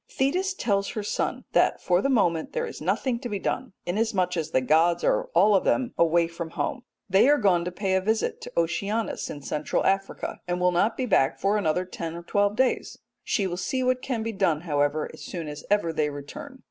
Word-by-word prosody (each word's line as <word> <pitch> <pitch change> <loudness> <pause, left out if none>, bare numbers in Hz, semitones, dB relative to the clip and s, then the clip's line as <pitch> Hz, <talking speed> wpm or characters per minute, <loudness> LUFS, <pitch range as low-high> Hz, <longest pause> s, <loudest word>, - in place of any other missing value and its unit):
Thetis 365 +9 0
tells 200 - 0
her 215 - -4
son 205 - -2
that - - +3
for 180 0 +2
the 275 - 0
moment 175 - +1
there 480 -1 -1
is 455 - -8
nothing 250 -3 0
to 245 -1 -5
be 205 - -2
done, 255 +3 -3
inasmuch 185 -2 0
as 160 -2 -2
the 130 - +2
gods 165 +6 +3
are - - +2
all 200 +5 +6
of 195 - +3
them 255 -3 +1
away 170 0 +3
from 170 0 -6
home. 245 +9 -3 0.3
They 195 +7 +5
are 295 - +5
gone 185 -7 +3
to 180 - -3
pay 190 +1 -1
a 190 - +3
visit 220 +3 -1
to - - -8
Oceanus 200 +6 -1
in 145 - -7
Central 150 0 -1
Africa, 195 0 -1
and 175 0 -1
will 180 0 +3
not 200 +6 +1
be 255 - -1
back 160 - +2
for 200 +2 +2
another 180 -3 +1
ten 165 -2 -6
or 170 - -7
twelve 205 +3 +1
days; 255 +1 0 0.3
she 200 - 0
will 175 -1 -3
see 260 +7 -1
what 255 0 +1
can 240 -5 -2
be 225 - -2
done, 165 -6 +1
however, 145 -2 0
as - - -12
soon 170 -4 -6
as 150 0 -7
ever 200 -5 +2
they 155 -1 +1
return. 145 - -9
190 Hz, 225 wpm, -26 LUFS, 170-225 Hz, 0.3 s, all